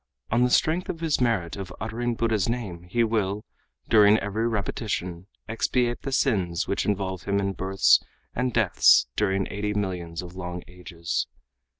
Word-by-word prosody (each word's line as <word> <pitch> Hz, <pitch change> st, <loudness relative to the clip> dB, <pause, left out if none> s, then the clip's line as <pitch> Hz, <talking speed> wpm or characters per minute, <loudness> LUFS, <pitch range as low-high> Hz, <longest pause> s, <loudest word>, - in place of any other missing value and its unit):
On 120 Hz, +2 st, +3 dB
the 125 Hz, -, +4 dB
strength 160 Hz, +7 st, +2 dB
of 165 Hz, -, -4 dB
(his 160 Hz, -5 st, +1 dB
merit 110 Hz, -9 st, +1 dB
of) 95 Hz, -2 st, -7 dB
uttering 115 Hz, +3 st, -2 dB
Buddha's 110 Hz, -3 st, +1 dB
name 105 Hz, -8 st, -4 dB
he 120 Hz, +5 st, +2 dB
will, 105 Hz, -2 st, -1 dB, 0.4 s
during 105 Hz, -1 st, +6 dB
every 110 Hz, +2 st, -1 dB
repetition 95 Hz, -4 st, -3 dB, 0.2 s
expiate 120 Hz, +2 st, 0 dB
the 135 Hz, -, -4 dB
sins 95 Hz, -, +1 dB
which 100 Hz, -, -1 dB
involve 95 Hz, -3 st, -2 dB
him 100 Hz, 0 st, +1 dB
in 100 Hz, 0 st, -1 dB
births 95 Hz, +1 st, +4 dB, 0.3 s
and 125 Hz, +1 st, -1 dB
deaths 105 Hz, -, +5 dB
during 95 Hz, -2 st, +1 dB
eighty 105 Hz, +1 st, -2 dB
millions 90 Hz, -4 st, -3 dB
of 90 Hz, 0 st, -10 dB
long 90 Hz, -1 st, -5 dB
ages. 85 Hz, -5 st, -4 dB
100 Hz, 160 wpm, -26 LUFS, 90-115 Hz, 0.4 s, during